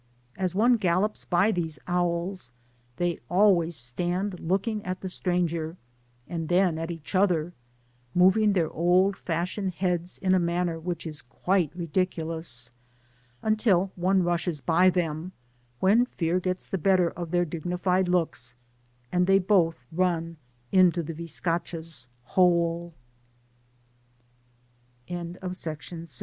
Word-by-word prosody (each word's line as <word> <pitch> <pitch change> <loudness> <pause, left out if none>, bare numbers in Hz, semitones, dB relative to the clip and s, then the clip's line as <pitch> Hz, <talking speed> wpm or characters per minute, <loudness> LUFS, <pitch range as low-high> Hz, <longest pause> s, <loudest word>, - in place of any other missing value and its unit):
As 185 -1 -1
one 235 +4 +4
gallops 195 +1 0
by 180 +5 +3
these 165 -5 -2
owls, 175 -3 -1 0.5
they 175 -1 -1
always 175 -3 +4
stand 175 +9 -1
looking 200 +5 -1
at 185 0 -4
the 190 - -4
stranger, 170 -2 -1 0.5
and 165 -2 -4
then 175 -2 +3
at 165 +1 -4
each 165 0 -7
other, 175 -4 +2 0.6
moving 190 +4 +5
their 170 -5 +1
old 180 +4 +3
fashioned 180 +3 -3
heads 180 -1 -1
in 185 -1 +1
a 185 - +4
manner 170 -1 0
which 170 0 -4
is 155 -2 -5
quite 175 +6 0
ridiculous, 165 -7 -2 0.7
until 215 -4 +2
one 185 +1 +2
rushes 175 -2 -1
by 170 +7 +4
them, 175 0 -2 0.5
when 225 +6 +4
fear 170 -5 0
gets 185 0 -3
the 190 - -3
better 185 0 +3
of 175 -1 -6
their 175 +1 +2
digni 175 +2 -4
fied 185 0 +2
looks, 160 -9 0 0.6
and 180 0 +2
they 195 0 +6
both 175 -8 +2
run 165 -1 0 0.3
into 180 -2 +4
the 165 +2 -5
biscac 165 +1 -3
175 Hz, 120 wpm, -27 LUFS, 165-185 Hz, 0.7 s, they